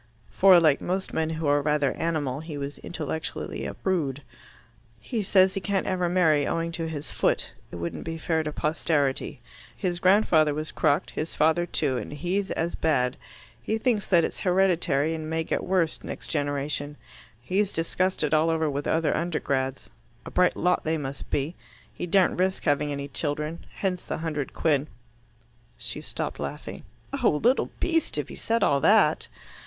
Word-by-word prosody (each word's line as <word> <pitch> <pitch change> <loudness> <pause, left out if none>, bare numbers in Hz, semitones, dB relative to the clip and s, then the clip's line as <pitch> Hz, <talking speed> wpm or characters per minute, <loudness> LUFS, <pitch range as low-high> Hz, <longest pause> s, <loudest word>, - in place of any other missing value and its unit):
For, 190 -2 +7
like 155 -4 +3
most 190 +2 -2
men 160 0 0
who 160 0 -3
are 145 0 +3
rather 150 -2 +1
animal, 150 -5 -1
he 160 -1 -7
was 140 0 -5
intellectually 160 - -4
a - - -6
prude. 145 -8 -1 0.8
"He 220 - -3
says 190 -1 +4
he 195 - -3
can't 195 +1 0
ever 180 -2 0
marry, 160 -5 +3
owing 165 0 -1
to 165 0 -3
his 150 -2 -5
foot. - - 0 0.2
It - - -7
wouldn't 85 0 -4
be 165 0 -4
fair 160 0 0
to 155 -1 -3
posterity. 150 -3 0 0.4
His 175 -2 -1
grandfather 175 -6 +4
was 155 +1 -3
crocked, 145 -3 +1
his 155 - -4
father 160 +3 +3
too, 130 -5 0
and - - -5
he's 180 +6 -1
as 165 +1 -1
bad. 125 -5 +1 0.5
He 220 - -1
thinks 225 -3 0
that 175 -3 +5
it's - - -3
hereditary, 175 -5 +2
and 155 -1 -5
may 160 0 0
get - - -2
worse 180 -4 0
next - - -7
generation. 145 0 -2 0.4
He's 190 +11 0
discussed 185 +2 0
it 150 - 0
all 155 +1 +4
over 160 -2 +1
with 145 +1 -3
other 160 -1 +1
Undergrads. 135 -6 -1 0.4
A - - -7
bright 180 -1 +3
lot 180 +1 +2
they 160 +1 0
must 140 -2 -6
be. 145 +4 -1 0.4
He 180 - -5
daren't 185 0 +3
risk 190 +1 +1
having 145 -1 +1
any 140 0 -4
children. 150 +2 -3
Hence 185 -2 -2
the - - -4
hundred 155 -3 -3
quid." 150 -2 +1 0.9
She - - -5
stopped - - -4
laughing. - - -6 0.4
"Oh, - - +6
little 250 +3 +3
beast, 330 -2 0
if - - -2
he - - -8
said 230 +1 0
all 140 - +3
that!" - - +4
160 Hz, 175 wpm, -26 LUFS, 145-180 Hz, 0.9 s, For